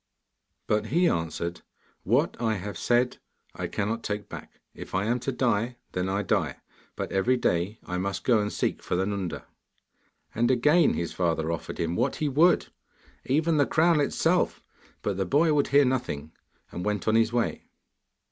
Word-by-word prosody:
But 105 0 0
he 175 +5 +3
answered: 85 - -2 0.4
'What - - +1
I 110 -2 +1
have 100 0 -5
said, 120 +7 +1 0.4
I - - -4
cannot 110 +2 -2
take 105 -1 -4
back. - - -10
If - - -8
I 95 +2 +1
am 120 +3 +1
to 125 +3 -2
die, 120 -1 0 0.2
then 90 +1 -2
I 100 +2 0
die, 80 -12 0 0.4
but - - -4
every 120 +7 +2
day 90 -1 0
I 90 0 -3
must 100 +1 -3
go 120 -4 +4
and 105 0 -1
seek - - -1
for - - -2
the 95 +2 +1
Nunda.' 100 -3 -4 0.9
And 120 +2 +1
again 150 +6 +4
his 85 - -3
father 80 -2 0
offered 85 - -5
him 85 0 -1
what 125 +6 0
he 155 - -1
would, 155 +6 +3 0.6
even 155 +4 +2
the 145 - +3
crown 165 0 +3
itself, 145 - +1 0.4
but 100 -2 -1
the 95 - +1
boy 155 - +3
would 145 -1 +2
hear 140 0 +5
nothing, 80 - -2 0.4
and 90 - -5
went 105 -2 -2
on 110 - +3
his 115 0 +3
way. 120 -1 -2
110 Hz, 175 wpm, -27 LUFS, 95-130 Hz, 0.9 s, hear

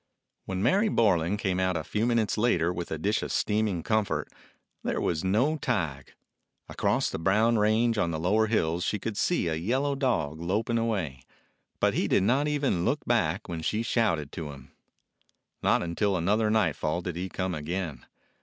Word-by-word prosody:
When 95 0 -3
Mary 200 - +3
Borlan 100 - +2
came 95 -3 -1
out 95 -2 +1
a 80 - -3
few 110 +9 -1
minutes 115 -3 +1
later 90 -7 +2
with 85 -1 -5
a 80 - -3
dish 105 +7 0
of - - -4
steaming 105 -5 0
comfort, 100 -10 0 0.5
there - - -1
was 80 -1 -1
no 120 +12 +2
Tige. 85 - -3 0.5
Across - - 0
the - - -4
brown 110 +6 +3
range 110 +2 +2
on 85 - +1
the 80 - -2
lower 105 +6 +2
hills 85 -5 0
she 105 - 0
could 105 +2 -4
see 170 - +1
a 80 - 0
yellow 130 - 0
dog 115 - -1
loping 110 +7 0
away, 95 - -2 0.6
but - - +2
he - - 0
did - - +3
not 130 +8 +2
even 140 -12 0
look 145 +10 0
back 100 -5 0
when 85 -2 -4
she 105 +7 -1
shouted 85 - 0
to 80 -4 -6
him. 70 -1 -13 0.9
Not - - +2
till 100 -3 +2
another 105 +6 +1
nightfall 100 -6 +1
did 90 -1 -4
he 90 +2 -4
come 95 -1 -2
again. 80 +1 -4
100 Hz, 180 wpm, -28 LUFS, 85-115 Hz, 0.9 s, Mary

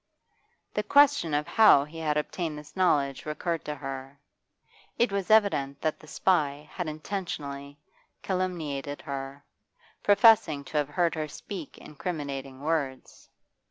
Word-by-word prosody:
The 210 - 0
question 280 - +4
of 150 0 0
how 215 -11 +6
he 155 +3 -10
had 150 -2 0
obtained 155 +1 -3
this 150 0 -12
knowledge 145 -7 +1
recurred 165 +2 -2
to 150 - -3
her. 135 0 -7 0.8
It 235 -3 +2
was 200 0 -2
evident 170 -11 +3
that 155 -1 -1
the 155 - -15
spy 150 -4 +1
had 180 -3 -3
intentionally 150 -4 -5 0.5
calumniated 160 -7 -3
her, 140 0 -6 0.6
professing 205 - +5
to 150 - -4
have 145 -1 +1
heard 170 +3 +1
her 155 -1 -3
speak 170 +1 -8
incriminating 140 -4 -6
words. 145 -4 -3
150 Hz, 130 wpm, -28 LUFS, 140-180 Hz, 0.8 s, how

